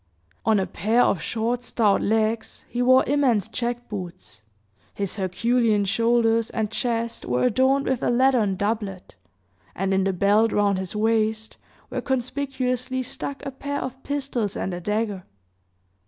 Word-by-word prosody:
On 220 -2 +4
a 190 - 0
pair 220 +8 +2
of 195 - +1
short, 240 +2 -2
stout 220 -4 +2
legs 220 +1 -1
he 245 - -3
wore 255 +1 +6
immense 255 -8 +2
jack 240 0 -3
boots, 175 - -8 0.5
his 200 +1 -3
Herculean 215 +2 +1
shoulders 230 +2 +2
and 220 -2 -2
chest 230 0 -2
were 125 0 0
adorned 260 +3 +3
with 260 -2 0
a - - +1
leathern 240 -5 +3
doublet, 205 -2 -3 0.6
and 195 +1 0
in 190 0 +2
the 195 - +1
belt 205 +4 +3
round 200 -2 +2
his 190 +1 -5
waist 220 0 0 0.3
were - - -2
conspicuously 260 -1 -2
stuck 275 +3 -6
a 275 - -3
pair 285 +2 -4
of 260 +1 -6
pistols 270 -8 -2
and 185 - -3
a 175 - -4
dagger. 210 -1 -2
225 Hz, 150 wpm, -24 LUFS, 200-250 Hz, 0.6 s, wore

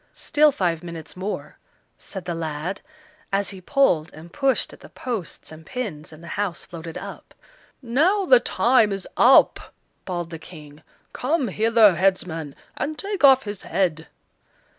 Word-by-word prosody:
"Still 300 0 +3
five 175 - -1
minutes 170 -3 -8
more," 190 +3 -5 0.4
said 190 -3 -8
the 175 - -2
lad, 165 +3 -4 0.5
as 200 0 0
he 190 -2 -10
pulled 180 - +2
and 165 +3 -13
pushed 275 -2 0
at - - -14
the - - -14
posts 225 -13 -6
and 155 0 -11
pins, 165 -9 -6
and 155 +1 -14
the - - -10
house 190 -4 -3
floated 165 -1 -8
up. - - -10 0.5
"Now 325 - +2
the - - +7
time 240 - +3
is 195 -1 -4
up," - - +5 0.3
bawled 175 -2 -4
the 165 - -7
King; 155 -3 -13 0.3
"come 275 -1 0
hither, 220 0 +5
headsman, 170 -5 -1 0.2
and 305 +1 -3
take 400 -1 -4
off 265 -1 +7
his 205 -2 -6
head." 165 -4 -1
190 Hz, 155 wpm, -23 LUFS, 165-250 Hz, 0.5 s, the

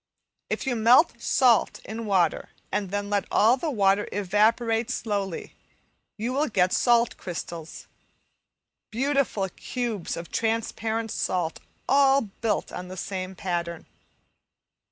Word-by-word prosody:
If - - -2
you 260 -2 0
melt 235 +3 +4
salt 240 -3 +3
in 220 +1 -5
water 185 -5 +1 0.2
and 205 -2 -1
then 205 +1 -3
let 205 -1 +1
all 225 +4 +5
the 310 +5 -3
water 200 -5 +2
evaporate 225 +4 +1
slowly, 200 -7 -3 0.6
you 230 +4 -2
will 295 +3 +1
get 185 -5 +2
salt 240 -1 +3
crystals; 170 -2 -7 1.0
beautiful 260 -4 0
cubes 230 -3 -4
of 170 0 -8
transparent 225 0 -1
salt 175 -3 -1 0.3
all 275 0 +5
built 215 +1 -2
on 180 0 -6
the 185 +1 -8
same 190 -1 -4
pattern. 170 -2 -3
215 Hz, 120 wpm, -26 LUFS, 190-235 Hz, 1.0 s, all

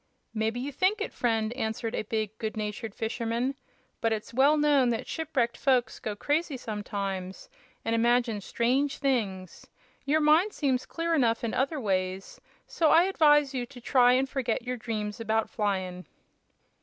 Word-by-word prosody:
"Mebbe 220 +1 -1
you 265 +4 -3
think 375 - +1
it, 425 - -4
friend," 225 -2 0
answered 225 -2 -3
a - - -1
big, 215 0 -3
good 220 -1 -4
natured 210 0 -4
fisherman; 230 +3 -2 0.5
"but 225 - +1
it's 220 0 -3
well 280 +5 +4
known 290 -4 +4
that 230 -1 -2
shipwrecked 275 -7 -1
folks 250 -4 +1
go 215 -1 -4
crazy 295 +5 -1
sometimes, 200 -4 -5 0.3
an' 225 - 0
imagine 235 -2 +2
strange 260 +7 0
things. 205 - -2 0.4
Your 295 +3 +2
mind 315 +7 +4
seems 260 -4 0
clear 335 0 -2
enough 235 -7 +2
in 230 - -2
other 280 +4 0
ways, 190 -3 -2 0.2
so 320 -2 +1
I 330 - +6
advise 295 -6 +4
you 245 -2 -3
to 250 0 -12
try 245 0 +4
and 265 +1 +2
forget 255 -3 -2
your 250 +1 -3
dreams 215 -3 -4
about 220 0 0
flyin'." 185 -4 -2
235 Hz, 160 wpm, -28 LUFS, 220-275 Hz, 0.5 s, I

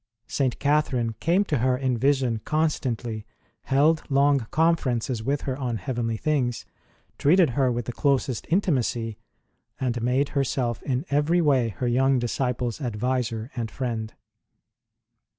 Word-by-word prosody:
St. 130 -1 -1
Catherine 140 -6 +1
came 175 +5 +2
to 150 -8 0
her 125 +1 +2
in 130 -1 0
vision 130 -2 +1
constantly, 125 -8 -1 0.4
held 150 +4 +3
long 140 0 +4
conferences 130 -8 +1
with 140 +5 -1
her 130 - -3
on 125 -4 -2
heavenly 115 +2 -2
things, 125 -4 -1 0.5
treated 165 0 +4
her 130 0 +2
with 120 -1 -2
the 120 - -3
closest 135 -3 0
intimacy, 125 - 0 0.6
and 120 -3 -1
made 130 +4 +1
herself 125 -4 -1
in 130 +2 -2
every 150 +5 +2
way 135 -8 +3
her 120 +4 -3
young 135 +2 +3
disciple 125 0 -1
s 120 - -8
adviser 120 0 -2
and, 115 -3 -3
friend. 115 -3 -4
130 Hz, 135 wpm, -25 LUFS, 120-145 Hz, 0.6 s, long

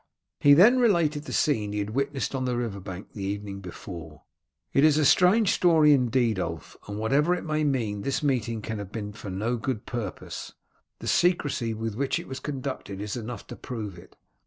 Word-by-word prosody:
He 145 0 +7
then 225 - +7
related 170 -10 +2
the - - -7
scene 105 -9 +1
he - - -2
had 105 0 -2
witnessed 140 +3 -1
on 130 -1 -1
the 125 -1 0
river 115 -5 -3
bank 95 0 -8
the 105 - -7
evening 100 0 -4
before. 85 -4 -9 0.5
"It 140 - +4
is 155 -1 +5
a 155 - +3
strange 185 +8 +5
story 160 -4 +5
indeed, 125 -5 +2
Ulf, 80 -2 -5
and 105 0 -5
whatever 140 +11 +2
it 180 - -6
may 155 -1 0
mean, 115 -8 0
this 140 +6 -1
meeting 115 -6 0
can 110 0 -4
have 100 -1 -7
been 105 -2 -5
for 105 -1 -8
no 110 +6 -1
good 120 -2 -3
purpose. 110 -7 -6 0.4
The - - -8
secrecy 145 -10 +1
with 110 0 -3
which 135 +3 0
it - - -7
was 130 - -6
conducted 130 -8 -5
is 105 0 -4
enough 120 -2 -6
to - - -8
prove 110 -6 -6
it. - - -17
120 Hz, 200 wpm, -27 LUFS, 105-145 Hz, 0.5 s, He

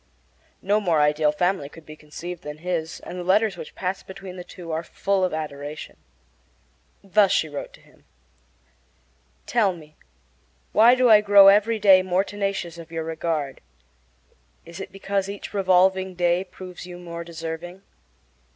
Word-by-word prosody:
No 205 +3 +2
more 170 -6 +2
ideal 150 0 +3
family 175 +1 0
life 140 - -11
could 165 -1 -14
be 155 - -11
conceived 165 +3 -8
than 150 -3 -8
his, 165 -1 -4
and 180 - -8
the - - -4
letters 200 +3 +2
which 160 -3 -10
passed 185 +1 -4
between 190 -1 -9
the 180 - -7
two 175 -2 -10
are 160 +1 -1
full 195 +3 -1
of 185 - +1
adoration. 150 -1 -6 1.1
Thus 200 0 +3
she 160 - +2
wrote 145 -2 -7
to - - -17
him: - - -25 1.4
Tell 215 -6 +2
me, 155 -3 -14 0.8
why 235 +3 +6
do 255 0 +3
I 210 -1 +8
grow 200 -1 +8
every 210 +3 +3
day 195 -3 +6
more 185 +1 +1
tenacious 195 -4 -4
of 165 -1 -11
your 165 -1 -3
regard? 160 -3 -3 1.0
Is 170 +2 -10
it 190 - -7
because 195 0 -2
each 200 +1 -7
revolving 190 -1 +2
day 175 +1 +1
proves 180 -1 -10
you 175 -1 -9
more 170 -1 -7
deserving? 170 +2 -7
180 Hz, 160 wpm, -24 LUFS, 160-195 Hz, 1.4 s, I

